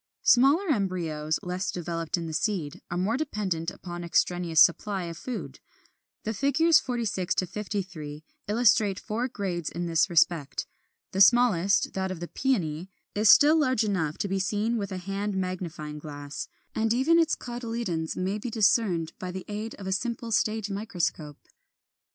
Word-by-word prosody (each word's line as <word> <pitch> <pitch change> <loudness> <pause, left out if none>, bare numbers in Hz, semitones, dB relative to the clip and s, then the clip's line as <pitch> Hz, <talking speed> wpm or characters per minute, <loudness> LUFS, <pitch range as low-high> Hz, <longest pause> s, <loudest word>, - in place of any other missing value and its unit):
] - - -58
34. - - +6
Smaller 290 +9 +4
embryos, 170 - -1
less 180 +2 -3
developed 170 -1 -3
in 170 - -4
the 160 - -5
seed, 170 -6 -2
are 175 - -3
more 195 +6 +1
dependent 195 - -2
upon 175 -1 -8
the 170 - -6
extraneous 170 -1 +1
supply 190 +3 +4
of 170 -1 -6
food. 235 +9 -6 0.6
The 220 - -2
figures 280 +8 +4
46 225 -7 -2
53 180 -6 -4 0.2
illustrate 210 -3 +3
four 230 +4 -2
grades 180 -8 -3
in 175 +1 -4
this 170 +2 +2
respect. 165 -4 +2 0.5
The 190 - 0
smallest, 200 -4 +4
that 190 0 -2
of 185 -3 -5
the 175 - -5
Peony, 180 - -1 0.2
is 210 0 +3
still 300 +7 +7
large 255 -6 +2
enough 175 -8 -1
to - - -2
be 195 0 -1
seen 210 +4 0
with 200 -2 -4
a 185 - -3
hand 195 +2 -3
magnifying 175 -5 -4
glass, 145 -1 -7 0.3
and 220 0 0
even 320 +7 +4
its 325 -2 +3
cotyledons 230 -9 -4
may 190 +3 -1
be 240 - -4
discerned 195 -6 +2
by 185 - -5
the 185 0 -6
aid 215 +2 -5
of 195 - -10
a 190 - -2
simple 235 +3 -2
stage 215 -1 0
microscope. 175 -7 -3
190 Hz, 165 wpm, -27 LUFS, 170-225 Hz, 0.6 s, still